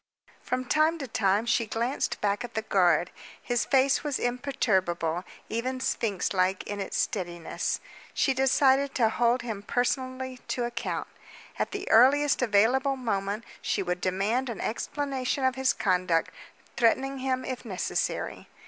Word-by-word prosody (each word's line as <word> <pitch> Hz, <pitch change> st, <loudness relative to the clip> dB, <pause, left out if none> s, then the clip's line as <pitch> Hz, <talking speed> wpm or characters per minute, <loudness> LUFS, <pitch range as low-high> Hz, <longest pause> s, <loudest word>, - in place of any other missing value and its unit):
From 255 Hz, 0 st, -2 dB
time 310 Hz, +5 st, +3 dB
to 275 Hz, -4 st, -5 dB
time 210 Hz, -2 st, +1 dB
she 230 Hz, -1 st, +1 dB
glanced 235 Hz, +5 st, -1 dB
back 205 Hz, +3 st, 0 dB
at 240 Hz, -1 st, -8 dB
the 220 Hz, -, -1 dB
guard. 175 Hz, -4 st, +3 dB, 0.3 s
His 240 Hz, -1 st, -1 dB
face 270 Hz, 0 st, +3 dB
was 290 Hz, -3 st, -1 dB
imperturbable, 190 Hz, -, 0 dB, 0.2 s
even 255 Hz, +3 st, -2 dB
sphinx 210 Hz, -7 st, -1 dB
like 185 Hz, 0 st, +1 dB
in 205 Hz, 0 st, -5 dB
its 195 Hz, -, -3 dB
steadiness. 175 Hz, -5 st, -2 dB, 0.3 s
She 270 Hz, -, +2 dB
decided 270 Hz, +1 st, +3 dB
to 230 Hz, -3 st, +3 dB
hold 240 Hz, +2 st, +1 dB
him 220 Hz, -4 st, -4 dB
personally 255 Hz, +2 st, -2 dB
to 245 Hz, -, -1 dB
account. 240 Hz, -1 st, -3 dB, 0.5 s
At -, -, 0 dB
the 400 Hz, -1 st, -5 dB
earliest 275 Hz, +6 st, +5 dB
available 250 Hz, +5 st, +3 dB
moment 210 Hz, -4 st, -2 dB, 0.2 s
she 200 Hz, -, -1 dB
would 180 Hz, 0 st, -2 dB
demand 205 Hz, +8 st, 0 dB
an 230 Hz, -, -5 dB
explanation 265 Hz, +2 st, -2 dB
of 260 Hz, -, +3 dB
his 265 Hz, 0 st, +2 dB
conduct, 180 Hz, -4 st, +1 dB, 0.4 s
threatening 270 Hz, +3 st, +2 dB
him 260 Hz, 0 st, -1 dB
if 255 Hz, -1 st, -5 dB
necessary. 195 Hz, -7 st, -3 dB
240 Hz, 145 wpm, -28 LUFS, 200-265 Hz, 0.5 s, earliest